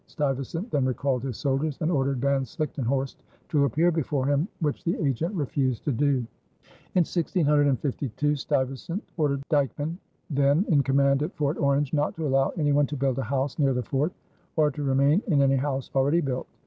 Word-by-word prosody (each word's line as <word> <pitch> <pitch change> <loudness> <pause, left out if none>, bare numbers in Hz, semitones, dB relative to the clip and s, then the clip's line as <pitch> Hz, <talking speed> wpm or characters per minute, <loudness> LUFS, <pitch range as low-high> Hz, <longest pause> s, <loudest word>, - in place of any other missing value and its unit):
Stuyvesant 150 - -3
then 140 - +1
recalled 130 0 0
his 130 -3 -4
soldiers 140 +1 -1
and 165 +1 0
ordered 135 -4 +1
Van 140 +1 +2
Slichtenhorst 135 0 -2 0.3
to 145 -2 +3
appear 160 +7 +2
before 145 -4 -1
him, 145 +4 +1
which 155 0 -2
the 170 -2 0
agent 140 - 0
refused 135 - -1
to 145 - +1
do. 135 -1 +1 0.7
In 180 -2 +4
1652 145 - +1
Stuyvesant 135 - -2
ordered 140 -4 0
Dyckman, 150 +3 0 0.3
then 140 +6 +3
in 150 -5 +4
command 140 0 +2
at 155 +6 -3
Fort 150 +1 -1
Orange, 140 0 +1
not 150 -1 0
to 160 - -3
allow 135 -1 +2
any 150 -3 +2
one 145 0 +3
to 145 - -5
build 135 -1 0
a - - +1
house 135 +3 -2
near 135 -3 +3
the 125 - -1
fort 140 +8 0 0.4
or 155 -3 +3
to 150 - -6
remain 140 +5 +3
in 155 -8 +3
any 135 0 +3
house 135 -1 -2
already 140 +5 +3
built. 130 -4 -3
140 Hz, 180 wpm, -26 LUFS, 135-150 Hz, 0.7 s, In